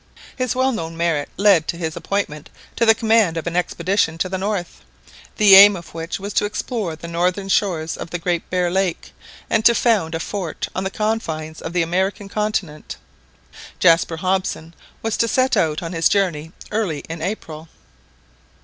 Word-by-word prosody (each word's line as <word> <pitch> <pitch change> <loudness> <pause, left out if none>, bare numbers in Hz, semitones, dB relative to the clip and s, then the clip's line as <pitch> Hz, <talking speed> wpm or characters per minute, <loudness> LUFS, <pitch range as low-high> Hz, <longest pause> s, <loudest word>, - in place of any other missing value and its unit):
His 255 -2 -2
well 260 +1 +2
known 165 -7 -5
merit 165 -4 0
led 195 -6 +4
to 170 - -3
his 160 -2 -4
appointment 160 -7 -3 0.3
to 230 - +1
the 225 - +7
command 220 -6 +2
of 165 - -4
an 170 0 -3
expedition 180 0 0
to 185 +3 -1
the 190 - -2
north, 195 -3 -3 0.6
the 205 -2 +6
aim 200 +1 +10
of 170 -2 -10
which 165 +2 -5
was 200 +1 -6
to 205 - +2
explore 205 -4 -3
the 170 - -9
northern 180 +3 -1
shores 170 -6 0
of - - -7
the 175 - -3
Great 170 0 -2
Bear 180 -1 0
Lake, 190 -2 -2 0.3
and 220 - +1
to 235 +1 +6
found 205 -11 +1
a - - -2
fort 180 -2 -4
on 185 - -3
the 190 - -2
confines 165 -8 -3
of - - -5
the 175 -1 +2
American 190 +4 -2
continent. 200 -8 -3 0.8
Jaspar 165 -1 +3
Hobson 185 -2 -2 0.3
was 225 -1 -1
to 230 - +2
set 255 +3 +2
out 155 +1 0
on 165 +1 -5
his 165 -1 +2
journey 165 -6 0 0.2
early 200 -9 -2
in 165 0 -6
April. 165 -4 -5
180 Hz, 180 wpm, -20 LUFS, 165-205 Hz, 0.8 s, aim